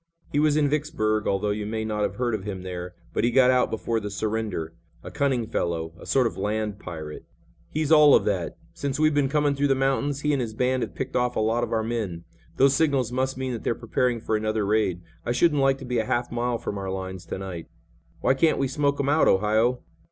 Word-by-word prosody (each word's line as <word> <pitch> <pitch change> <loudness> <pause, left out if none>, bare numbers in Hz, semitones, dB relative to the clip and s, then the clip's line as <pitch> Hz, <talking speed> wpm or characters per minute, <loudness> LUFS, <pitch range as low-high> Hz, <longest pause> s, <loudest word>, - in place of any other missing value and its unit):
He 145 - +1
was 150 0 +3
in 150 -1 +3
Vicksburg, 140 -8 0
although 100 +1 +1
you 105 0 -3
may 110 0 -2
not 105 -1 -2
have - - -1
heard 120 -2 -1
of 105 -3 -2
him 95 -3 -5
there, 90 -1 -6 0.2
but - - 0
he 120 - +4
got 130 +1 +5
out 125 -1 +3
before 115 +1 -1
the 105 -1 -5
surrender. 105 -6 -3 0.3
A - - -8
cunning 130 -5 0
fellow. 85 -6 -2
A - - -11
sort 130 -2 +3
of 115 - -2
land 105 0 -2
pirate." 80 -5 -7 0.5
"He's 155 0 -1
all 150 -2 +8
of - - +3
that. - - -1 0.2
Since 140 0 -3
we've 155 0 +4
been 145 -2 +2
coming 145 0 +2
through 140 +1 +1
the 135 - +3
mountains 135 +1 0
he 150 0 +1
and 140 - +1
his 110 -3 -4
band 130 +2 +1
have - - -4
picked 130 0 -4
off 125 0 +1
a - - 0
lot 115 +2 +1
of - - -3
our 110 -1 +1
men. 110 -7 -3 0.3
Those 135 0 +5
signals 135 -5 +1
must 130 +1 -1
mean 130 -1 -2
that 115 - -5
they're 115 - 0
preparing 120 +1 0
for 110 0 -1
another 110 0 0
raid. 100 -4 +1 0.2
I 120 - -1
shouldn't 150 +2 +3
like 135 0 +3
to 135 - -9
be 125 -1 0
a 110 - 0
half 120 +2 -1
mile 120 0 -1
from 100 -3 -5
our 95 -1 -4
lines 95 -1 -5
to - - -4
night." 95 -4 -6 0.5
"Why - - +4
can't 155 +4 +2
we 135 - +1
smoke 140 +1 0
him 140 - 0
out, 150 +3 +4
Ohio?" 110 +5 +2
120 Hz, 240 wpm, -25 LUFS, 105-135 Hz, 0.5 s, all